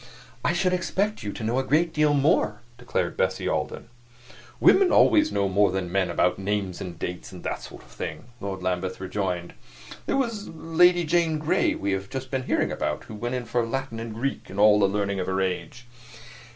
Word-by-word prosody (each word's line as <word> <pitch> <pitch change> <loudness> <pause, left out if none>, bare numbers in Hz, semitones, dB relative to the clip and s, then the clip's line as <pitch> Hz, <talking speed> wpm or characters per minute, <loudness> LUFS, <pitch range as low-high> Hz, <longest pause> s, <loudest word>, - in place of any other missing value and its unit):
"I - - +2
should 180 +1 +1
expect 200 +4 -1
you 100 - -4
to 110 - -7
know 115 +4 +1
a - - 0
great 160 +5 +2
deal 150 -1 +3
more," 120 -7 +2 0.2
declared - - -2
Bessie - - 0
Alden. - - -2 0.7
"Women 380 -1 +5
always 310 0 +5
know 100 - +1
more 100 +1 +3
than 95 -2 -3
men 95 0 +1
about 90 - +1
names 100 -2 -2
and 90 -3 -6
dates 90 +1 -5
and - - -10
that - - -3
sort - - -11
of - - -20
thing," 80 -1 -6
Lord 95 -2 -5
Lambeth 90 0 -2
rejoined. 95 -2 -3 0.5
"There - - +1
was 230 -6 -2
Lady 175 +2 +3
Jane 165 -1 +2
Grey 155 +1 +1
we 100 0 -2
have 95 0 -2
just 130 -1 -6
been 130 -2 -2
hearing - - +1
about, - - -2
who - - -11
went 120 +4 -3
in 125 -1 -3
for 115 +1 0
Latin 125 0 -3
and 115 -1 -6
Greek 135 +4 -3
and 95 - -6
all 105 0 +6
the 100 - +4
learning 100 0 -1
of 90 - -2
her 95 0 0
age." 95 +6 -3
110 Hz, 205 wpm, -25 LUFS, 95-155 Hz, 0.7 s, all